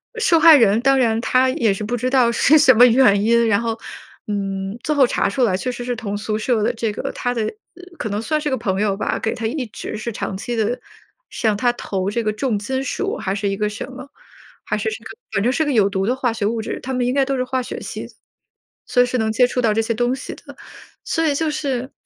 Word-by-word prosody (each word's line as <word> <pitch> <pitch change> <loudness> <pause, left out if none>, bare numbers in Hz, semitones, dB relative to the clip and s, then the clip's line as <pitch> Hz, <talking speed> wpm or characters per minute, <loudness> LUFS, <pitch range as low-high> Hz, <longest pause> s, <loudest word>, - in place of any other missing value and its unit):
后 - - -5
受 345 -8 +4
害 320 -1 +9
人， 220 -4 +4
当 270 +1 +3
然 225 -2 +2
她 255 +1 +3
也 230 -5 +1
是 195 - -5
不 225 +4 -2
知 250 +2 -1
道 255 -3 +3
是 300 +6 +4
什 260 -3 +7
么 245 +3 +8
原 230 -5 +4
因， 235 +1 +3
然 205 -1 +2
后， 230 -1 -3 0.5
嗯， 195 0 -3
最 305 - 0
后 270 -3 +5
查 - - 0
出 250 +5 0
来 190 -6 +2
确 250 +6 -3
实 245 0 -7
是 245 0 -2
同 205 -3 -4
宿 215 +1 -2
舍 225 0 0
的 230 +3 +1
这 225 -2 -2
个 205 - -4
她 245 - -2
的 230 -3 -1 0.5
可 220 - -4
能 205 +1 -2
算 305 +6 -1
是 295 - -1
个 260 - 0
朋 200 -4 -1
友 200 -2 0
吧， 215 - -1
给 220 - -1
她 225 - -5
一 265 +2 -3
直 215 - -7
是 225 +2 -4
长 200 - -4
期 240 +4 -4
地 225 +3 -1 0.5
向 220 -3 0
她 245 +3 +2
投 195 -5 -3
这 235 +2 -1
个 215 -1 0
重 220 -2 -1
金 260 +6 -3
属 270 - -2
还 190 - -2
是 200 0 -2
一 195 - -1
个 210 +1 -1
什 210 - -6
么， 260 +1 -10 0.5
还 210 - -2
是 220 +1 -1
是 215 - -5 0.3
反 200 -1 0
正 245 - +2
是 315 - +1
个 295 - -1
有 215 -6 +4
毒 195 0 -1
的 250 - +1
化 255 -3 -1
学 215 -2 -2
物 230 +1 -1
质。 - - -5
她 265 - -5
们 250 -1 0
应 250 - 0
该 275 0 +3
都 270 0 -1
是 255 - 0
化 255 0 -2
学 245 - -6
系， - - -6 0.8
所 245 - +4
以 - - +1
是 250 +1 -2
能 220 0 0
接 250 +3 +4
触 250 - -2
到 225 -3 +2
这 225 - +2
些 230 +1 -1
东 245 +3 0
西 265 - -7
的。 - - -14 0.5
所 325 - 0
以 290 - +1
就 315 +1 0
是， 270 -4 -3
235 Hz, 285 characters per minute, -20 LUFS, 210-255 Hz, 0.8 s, 害